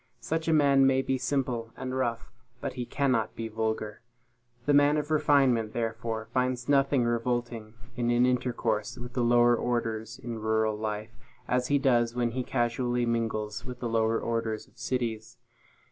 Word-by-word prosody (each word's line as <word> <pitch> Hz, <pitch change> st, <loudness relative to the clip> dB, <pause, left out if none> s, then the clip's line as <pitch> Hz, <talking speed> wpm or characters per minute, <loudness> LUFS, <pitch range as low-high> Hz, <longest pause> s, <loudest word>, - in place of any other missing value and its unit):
Such 160 Hz, +1 st, -2 dB
a -, -, +3 dB
man 140 Hz, -3 st, +5 dB
may 135 Hz, 0 st, +3 dB
be 130 Hz, -1 st, -1 dB
simple 125 Hz, -4 st, -1 dB
and 130 Hz, 0 st, -4 dB
rough, 120 Hz, -2 st, -2 dB, 0.3 s
but -, -, -4 dB
he 125 Hz, -2 st, -5 dB
cannot 130 Hz, -6 st, 0 dB
be 115 Hz, -, -4 dB
vulgar. 110 Hz, -1 st, -3 dB, 0.6 s
The 145 Hz, -, +3 dB
man 145 Hz, +1 st, +5 dB
of 150 Hz, +1 st, -3 dB
refinement, 135 Hz, -7 st, +3 dB
therefore, 115 Hz, -1 st, -3 dB
finds 125 Hz, -1 st, 0 dB
nothing 140 Hz, -2 st, +3 dB
revolting 120 Hz, -1 st, -2 dB, 0.2 s
in 120 Hz, -1 st, 0 dB
an 120 Hz, +1 st, +4 dB
intercourse 120 Hz, -4 st, -1 dB
with 120 Hz, 0 st, -8 dB
the 125 Hz, -, 0 dB
lower 120 Hz, 0 st, +5 dB
orders 115 Hz, -1 st, -2 dB
in 115 Hz, -1 st, -6 dB
rural 110 Hz, 0 st, +1 dB
life, 105 Hz, +1 st, -4 dB, 0.4 s
as 125 Hz, 0 st, +1 dB
he 145 Hz, -, +3 dB
does 120 Hz, -3 st, +2 dB
when 120 Hz, -1 st, 0 dB
he 130 Hz, +2 st, -2 dB
casually 120 Hz, 0 st, 0 dB
mingles 110 Hz, -2 st, -2 dB
with 125 Hz, -1 st, -8 dB
the 120 Hz, -, -3 dB
lower 115 Hz, 0 st, +1 dB
orders 115 Hz, -2 st, -2 dB
of -, -, -27 dB
cities. 120 Hz, -2 st, -3 dB
120 Hz, 165 wpm, -28 LUFS, 115-130 Hz, 0.6 s, man